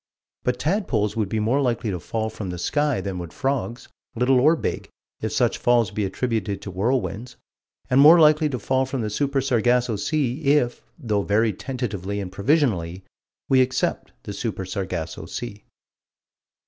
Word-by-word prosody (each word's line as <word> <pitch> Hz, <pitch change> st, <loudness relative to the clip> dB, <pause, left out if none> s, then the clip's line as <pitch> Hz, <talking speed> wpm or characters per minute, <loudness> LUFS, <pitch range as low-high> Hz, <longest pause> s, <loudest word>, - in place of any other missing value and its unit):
But 125 Hz, 0 st, 0 dB
tadpoles 140 Hz, -, 0 dB
would 110 Hz, -4 st, -1 dB
be 110 Hz, -, -1 dB
more 120 Hz, +7 st, +1 dB
likely 120 Hz, -4 st, 0 dB
to 90 Hz, -, -3 dB
fall 110 Hz, +5 st, -3 dB
from 105 Hz, -3 st, -6 dB
the 90 Hz, -, -4 dB
sky 145 Hz, -, 0 dB
than 95 Hz, -2 st, -4 dB
would 85 Hz, -2 st, -7 dB
frogs, 135 Hz, -2 st, -2 dB, 0.3 s
little 125 Hz, +2 st, +3 dB
or 155 Hz, +6 st, +5 dB
big, -, -, -4 dB, 0.3 s
if -, -, -2 dB
such -, -, +1 dB
falls 120 Hz, -4 st, +3 dB
be 105 Hz, -, -1 dB
attributed 105 Hz, 0 st, -2 dB
to 100 Hz, -, -6 dB
whirlwinds; 120 Hz, +4 st, -2 dB, 0.5 s
and 130 Hz, +2 st, +4 dB
more 160 Hz, +4 st, +9 dB
likely 155 Hz, -1 st, +5 dB
to 130 Hz, -, -2 dB
fall 130 Hz, +4 st, 0 dB
from 130 Hz, -1 st, -3 dB
the 105 Hz, -1 st, -3 dB
Super 140 Hz, +4 st, 0 dB
Sargasso 120 Hz, -3 st, +2 dB
Sea 140 Hz, +4 st, -1 dB
if, 140 Hz, -4 st, +2 dB, 0.2 s
though 110 Hz, -8 st, -1 dB
very 105 Hz, +2 st, +2 dB
tentatively 100 Hz, -5 st, -4 dB
and 95 Hz, -2 st, -5 dB
provisionally, 100 Hz, -, 0 dB, 0.4 s
we 130 Hz, -1 st, +5 dB
accept 130 Hz, 0 st, -1 dB
the 100 Hz, -, -6 dB
Super 100 Hz, -3 st, -4 dB
Sargasso 90 Hz, -4 st, -4 dB
Sea. 105 Hz, +1 st, -6 dB
120 Hz, 165 wpm, -23 LUFS, 100-135 Hz, 0.5 s, more